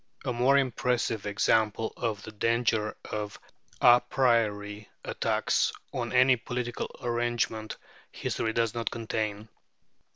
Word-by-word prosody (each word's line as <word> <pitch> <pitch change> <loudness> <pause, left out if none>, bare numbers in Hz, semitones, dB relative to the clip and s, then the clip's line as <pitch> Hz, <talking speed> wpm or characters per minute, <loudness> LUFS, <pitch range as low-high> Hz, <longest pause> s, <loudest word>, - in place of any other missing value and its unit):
A 125 - 0
more 125 +4 +4
impressive 125 -5 0
example 110 +1 +1
of 110 -4 -3
the 110 - -8
danger 110 0 0
of 105 -1 -4 0.4
à 120 0 +7
priori 105 -5 +1 0.2
attacks - - +1 0.2
on - - -3
any 130 +1 +6
political 125 0 -4
arrangement, 120 -2 -1 0.3
history 110 - -2
does 115 -1 0
not 115 -1 -2
contain. 110 -2 -3
115 Hz, 110 wpm, -28 LUFS, 110-120 Hz, 0.4 s, à